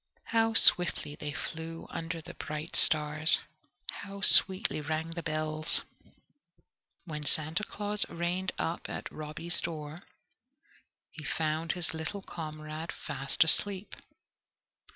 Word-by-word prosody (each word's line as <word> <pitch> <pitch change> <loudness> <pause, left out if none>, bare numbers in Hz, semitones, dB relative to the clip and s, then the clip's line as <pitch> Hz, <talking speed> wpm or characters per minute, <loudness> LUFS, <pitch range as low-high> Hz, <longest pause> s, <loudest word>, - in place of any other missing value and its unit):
How 225 -1 0
swiftly 175 -7 +6
they 150 0 -6
flew 160 +4 -7
under 165 0 -6
the - - -11
bright 155 +1 -7
stars! 155 +1 +6 0.5
How 200 0 -10
sweetly 190 -4 +6
rang 160 +2 -4
the 170 0 -6
bells! 155 +1 0 1.2
When 150 -3 -7
Santa 155 +6 +1
Claus 210 0 -3
reined 175 +2 -4
up 165 - -5
at - - -7
Robby's 155 +3 -2
door, 155 0 -7 1.1
he 155 - -11
found 155 +2 -3
his 175 -3 -4
little 160 +5 -6
comrade 155 -1 -8
fast 135 0 -2
asleep. 195 +4 0
160 Hz, 110 wpm, -28 LUFS, 155-175 Hz, 1.2 s, swiftly